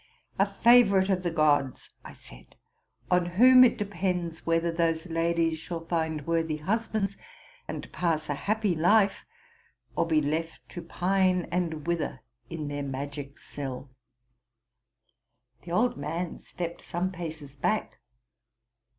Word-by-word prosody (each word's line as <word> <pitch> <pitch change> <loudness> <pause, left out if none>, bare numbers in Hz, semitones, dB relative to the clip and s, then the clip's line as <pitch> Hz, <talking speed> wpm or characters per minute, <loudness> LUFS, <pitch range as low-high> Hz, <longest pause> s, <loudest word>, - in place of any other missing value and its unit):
'' - - -40
—'* - - -30
A 195 - +4
favorite 200 -2 +5
of 185 -1 +1
the 175 - -1
gods,'' 145 -4 +1
I - - -10
said, - - -16 0.6
''on 180 -1 +3
whom 255 +4 +8
it 245 - +4
depends 180 -5 -3
whether 165 0 +2
those 165 0 0
ladies 165 -1 0
shall 165 0 -6
find 160 -3 -2
worthy 165 -2 0
husbands 200 +3 -1 0.5
and - - -6
pass 160 -3 0
a 145 - -1
happy 205 +6 0
life, 195 +5 +3 0.7
or 165 - +1
be 160 -2 +3
left 160 +3 -3
to 175 - -7
pine 185 +1 +1
and 165 -4 -2
wither 170 -6 -2 0.3
in 155 -3 -5
Dae 145 0 -4
magic 140 +1 -6
cell.'' 135 -1 -7 1.7
.The 170 - -8
old 230 +8 +2
man 170 +1 -4
stepped 170 -1 -6
some 180 +2 -2
paces 160 -5 -7
back. 215 +10 -1
170 Hz, 135 wpm, -28 LUFS, 155-185 Hz, 1.7 s, whom